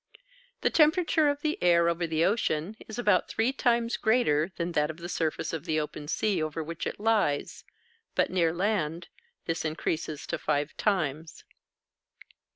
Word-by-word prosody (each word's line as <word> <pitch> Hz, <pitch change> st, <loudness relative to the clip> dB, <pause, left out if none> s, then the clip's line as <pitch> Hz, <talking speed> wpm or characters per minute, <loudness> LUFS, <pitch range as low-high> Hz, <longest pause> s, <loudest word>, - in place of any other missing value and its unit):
The -, -, +2 dB
temperature 315 Hz, 0 st, +4 dB
of 285 Hz, 0 st, -2 dB
the 310 Hz, 0 st, -2 dB
air 170 Hz, -1 st, +4 dB
over 170 Hz, 0 st, 0 dB
the 160 Hz, +1 st, +1 dB
ocean 195 Hz, -3 st, 0 dB
is 220 Hz, -, -7 dB
about 205 Hz, -6 st, +2 dB
three 230 Hz, +4 st, 0 dB
times 235 Hz, -3 st, +1 dB
greater 195 Hz, -8 st, +2 dB
than 170 Hz, 0 st, -2 dB
that 150 Hz, -2 st, +1 dB
of 160 Hz, -, -6 dB
the 170 Hz, 0 st, -7 dB
surface 160 Hz, -2 st, -2 dB
of 165 Hz, -1 st, -4 dB
the 155 Hz, -3 st, 0 dB
open 150 Hz, -1 st, -5 dB
sea 190 Hz, +2 st, 0 dB
over 155 Hz, +1 st, -3 dB
which 165 Hz, +1 st, -5 dB
it -, -, -5 dB
lies; 210 Hz, -10 st, 0 dB, 0.5 s
but, -, -, +2 dB
near 170 Hz, -3 st, +2 dB
land, 175 Hz, -3 st, -1 dB, 0.4 s
this 165 Hz, -1 st, -2 dB
increases 155 Hz, -1 st, -3 dB
to -, -, -3 dB
five 145 Hz, +1 st, -1 dB
times. 160 Hz, -6 st, -1 dB
170 Hz, 160 wpm, -28 LUFS, 155-220 Hz, 0.5 s, temperature